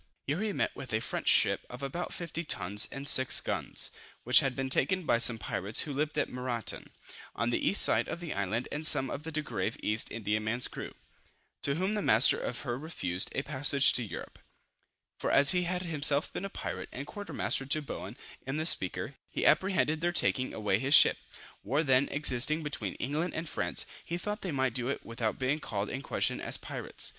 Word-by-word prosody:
Here 150 Hz, +7 st, -2 dB
he 215 Hz, -1 st, -1 dB
met -, -, -2 dB
with 130 Hz, -, -8 dB
a 110 Hz, -, +2 dB
French -, -, -4 dB
ship -, -, +4 dB
of 125 Hz, +2 st, -9 dB
about 140 Hz, +6 st, -4 dB
50 170 Hz, -1 st, -5 dB
tons, 100 Hz, -2 st, 0 dB
and 140 Hz, +1 st, -5 dB
6 130 Hz, -3 st, +4 dB
guns, -, -, -1 dB, 0.3 s
which -, -, +6 dB
had 135 Hz, -2 st, -1 dB
been 135 Hz, 0 st, -2 dB
taken 185 Hz, +8 st, +2 dB
by 120 Hz, -7 st, +2 dB
some 115 Hz, -1 st, +4 dB
pirates 105 Hz, 0 st, 0 dB
who 145 Hz, -, -3 dB
lived 150 Hz, +2 st, -2 dB
at -, -, +1 dB
Maratan, 125 Hz, -2 st, -2 dB, 0.5 s
on 115 Hz, +2 st, -1 dB
the -, -, -1 dB
east 200 Hz, -, +6 dB
side -, -, +2 dB
of -, -, -5 dB
the 170 Hz, -2 st, -5 dB
island, 100 Hz, +5 st, -2 dB
and 155 Hz, +2 st, +2 dB
some 135 Hz, -4 st, +5 dB
of 140 Hz, -, -5 dB
the 160 Hz, +1 st, -7 dB
Degrave 145 Hz, -9 st, -3 dB
East 110 Hz, +1 st, +1 dB
Indiaman's 110 Hz, +2 st, -1 dB
crew, -, -, -8 dB, 0.7 s
to 140 Hz, -, +2 dB
whom 190 Hz, +5 st, 0 dB
the 210 Hz, -, -1 dB
master 110 Hz, -, +5 dB
of 125 Hz, -, -4 dB
her 125 Hz, -2 st, -4 dB
refused 95 Hz, -, -2 dB
a 135 Hz, -, -1 dB
passage 140 Hz, 0 st, +3 dB
to -, -, -2 dB
Europe; 100 Hz, -8 st, -8 dB, 0.8 s
for -, -, -2 dB
as 140 Hz, -, +6 dB
he 180 Hz, -1 st, +1 dB
had 180 Hz, +1 st, -2 dB
himself 150 Hz, -3 st, +3 dB
been 195 Hz, -, -4 dB
a -, -, -4 dB
pirate, -, -, -6 dB
and 140 Hz, -, -6 dB
quarter 205 Hz, +6 st, -8 dB
master 135 Hz, -, 0 dB
to 150 Hz, +3 st, +2 dB
Bowen, 145 Hz, -, -7 dB, 0.3 s
in 135 Hz, +2 st, -2 dB
the 155 Hz, -, -2 dB
Speaker, 95 Hz, -, +2 dB, 0.2 s
he -, -, -3 dB
apprehended 185 Hz, -5 st, +2 dB
their 175 Hz, +1 st, +1 dB
taking 130 Hz, -6 st, +1 dB
away 105 Hz, -2 st, 0 dB
his 135 Hz, +5 st, +4 dB
ship. -, -, +6 dB, 0.4 s
War 140 Hz, +9 st, 0 dB
then 135 Hz, -1 st, +3 dB
existing 145 Hz, +2 st, +1 dB
between 115 Hz, -10 st, -4 dB
England 150 Hz, +7 st, -3 dB
and 160 Hz, +1 st, -3 dB
France, -, -, -1 dB, 0.2 s
he 170 Hz, -, -4 dB
thought 210 Hz, +4 st, -4 dB
they 185 Hz, -, -3 dB
might 130 Hz, -3 st, 0 dB
do 125 Hz, 0 st, -2 dB
it 140 Hz, -, -4 dB
without 115 Hz, -1 st, -3 dB
being 135 Hz, +4 st, 0 dB
called 105 Hz, -8 st, -4 dB
in 135 Hz, -, -4 dB
question -, -, -1 dB
as -, -, -1 dB
pirates. -, -, -5 dB
140 Hz, 205 wpm, -30 LUFS, 115-155 Hz, 0.8 s, which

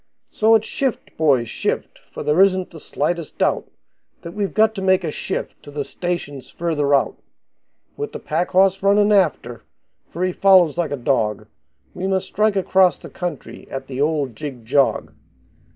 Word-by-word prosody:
So 220 Hz, +1 st, +4 dB
it's 220 Hz, -1 st, +2 dB
shift, 265 Hz, 0 st, -3 dB
boys, 135 Hz, -7 st, +2 dB
shift, -, -, -3 dB
for -, -, -6 dB
there 150 Hz, +5 st, +3 dB
isn't 185 Hz, -2 st, +2 dB
the 165 Hz, -, -11 dB
slightest 160 Hz, +2 st, -3 dB
doubt -, -, 0 dB, 0.5 s
That 170 Hz, -, -7 dB
we've 200 Hz, +1 st, -2 dB
got 220 Hz, 0 st, +4 dB
to 195 Hz, -, -5 dB
make 190 Hz, -1 st, +3 dB
a 160 Hz, -, -2 dB
shift -, -, -5 dB
to -, -, -13 dB
the 145 Hz, 0 st, -4 dB
stations 145 Hz, -5 st, -5 dB
further 150 Hz, -4 st, 0 dB
out, 135 Hz, -, 0 dB, 0.8 s
With 435 Hz, 0 st, -4 dB
the -, -, -6 dB
pack 170 Hz, +3 st, -2 dB
horse 190 Hz, +1 st, +3 dB
runnin' 205 Hz, +1 st, +4 dB
after, 155 Hz, -, +1 dB, 0.5 s
for 175 Hz, -, -4 dB
he 185 Hz, -, +1 dB
follows 185 Hz, -6 st, +5 dB
like 175 Hz, 0 st, -1 dB
a 145 Hz, -, -2 dB
dog, 110 Hz, -5 st, 0 dB, 0.5 s
We 185 Hz, +1 st, -4 dB
must 190 Hz, -1 st, 0 dB
strike 210 Hz, +1 st, +1 dB
across 190 Hz, -1 st, +3 dB
the -, -, -12 dB
country 175 Hz, -6 st, -6 dB
at 135 Hz, 0 st, -6 dB
the 135 Hz, 0 st, -5 dB
old 145 Hz, -5 st, 0 dB
jig 135 Hz, -5 st, -7 dB
jog. 135 Hz, +3 st, +1 dB
170 Hz, 175 wpm, -21 LUFS, 145-195 Hz, 0.8 s, follows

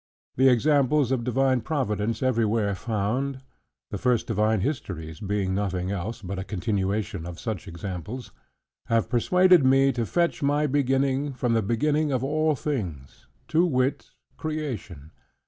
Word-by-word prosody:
The 130 Hz, +1 st, +5 dB
examples 140 Hz, +1 st, +3 dB
of 130 Hz, -3 st, 0 dB
divine 130 Hz, +1 st, +2 dB
providence, 115 Hz, -5 st, -1 dB
everywhere 110 Hz, -4 st, +1 dB
found 115 Hz, +7 st, -2 dB, 0.5 s
(the -, -, -3 dB
first 125 Hz, -3 st, +1 dB
divine 110 Hz, -1 st, +1 dB
histories 90 Hz, -, -4 dB
being 100 Hz, -2 st, -1 dB
nothing 95 Hz, -2 st, -1 dB
else 100 Hz, +4 st, -4 dB
but 95 Hz, +1 st, -4 dB
a -, -, -3 dB
continuation 100 Hz, -2 st, -2 dB
of 90 Hz, 0 st, -8 dB
such 110 Hz, -7 st, -4 dB
examples) 95 Hz, +8 st, -6 dB, 0.6 s
have 115 Hz, +1 st, +1 dB
persuaded 180 Hz, +7 st, +5 dB
me 135 Hz, +1 st, +5 dB
to 120 Hz, -3 st, -2 dB
fetch 170 Hz, -1 st, 0 dB
my 145 Hz, +1 st, +2 dB
beginning 135 Hz, 0 st, +1 dB
from 125 Hz, -2 st, 0 dB
the 115 Hz, -, +3 dB
beginning 145 Hz, +8 st, +1 dB
of 130 Hz, -2 st, 0 dB
all 155 Hz, +2 st, +1 dB
things: 90 Hz, -, -5 dB, 0.2 s
to 160 Hz, +2 st, +3 dB
wit, 130 Hz, -5 st, 0 dB, 0.3 s
Creation. 125 Hz, -, -5 dB
120 Hz, 140 wpm, -26 LUFS, 100-140 Hz, 0.6 s, The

